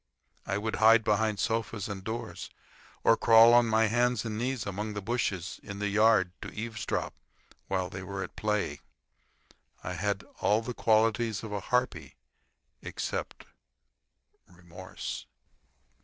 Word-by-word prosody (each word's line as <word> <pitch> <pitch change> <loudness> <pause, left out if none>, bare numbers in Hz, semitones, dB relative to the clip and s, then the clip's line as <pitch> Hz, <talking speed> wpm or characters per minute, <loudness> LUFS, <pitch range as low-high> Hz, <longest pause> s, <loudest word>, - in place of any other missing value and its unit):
I 95 - 0
would 110 +2 -2
hide 110 0 +6
behind 110 0 +1
sofas 115 -2 -1
and 100 -3 -6
doors, 110 +3 -5 0.5
or 115 - +6
crawl 115 +1 +7
on 120 -1 +6
my 110 0 +3
hands 120 +1 +1
and 110 -2 -3
knees 125 +1 -2
among 105 +2 -4
the - - -2
bushes 100 -6 -2
in 100 - -8
the 105 0 -1
yard 105 -3 +4
to - - -6
eavesdrop 110 0 -3 0.5
while 95 -2 -1
they 95 +1 -7
were 95 +1 -5
at 90 - -9
play. 105 -1 -1 1.0
I 90 - -4
had 100 +2 -2 0.2
all 110 +2 +2
the 125 - -4
qualities 110 -1 +2
of 110 - -6
a 100 - -1
harpy 125 +5 -1 0.7
except - - -5 1.0
remorse. 90 +1 -8
110 Hz, 140 wpm, -29 LUFS, 100-115 Hz, 1.0 s, crawl